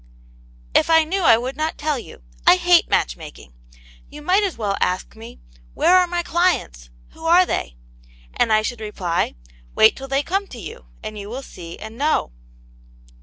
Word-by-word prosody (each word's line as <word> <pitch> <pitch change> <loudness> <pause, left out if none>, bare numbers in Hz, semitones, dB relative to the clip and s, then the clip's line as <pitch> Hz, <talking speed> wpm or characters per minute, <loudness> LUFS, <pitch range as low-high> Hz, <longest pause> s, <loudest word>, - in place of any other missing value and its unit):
'* - - -28 0.3
If - - +3
I 320 -1 +6
knew 375 +5 -2
I 240 -9 +6
\yould 250 +4 -4
not 310 +1 -2
tell 295 -3 -1
you. 140 - -13 0.2
I - - +9
hate 350 - +4
match - - +1
making. - - -12 0.6
You 295 0 -11
might 370 +6 +3
as 395 -4 -2
well 205 -3 -1
ask 180 +4 -1
me, 220 - -12 0.4
where 360 - +4
are 365 -1 +5
my 350 0 -2
clients? 330 - 0 0.2
Who 325 - -13
are 355 +2 +6
they? - - -3 0.6
And 225 - +1
I 215 0 +4
should 240 0 -4
reply, 180 - -2 0.4
wait 220 - +6
till 270 - -8
they 275 +1 0
come 390 +5 -2
to 245 - -10
you 65 - -10 0.2
and 215 -1 -6
you 200 0 -8
will 260 +4 -6
see 170 -7 -10
and 220 +3 -10
know." 295 - +1
255 Hz, 190 wpm, -21 LUFS, 210-335 Hz, 0.6 s, I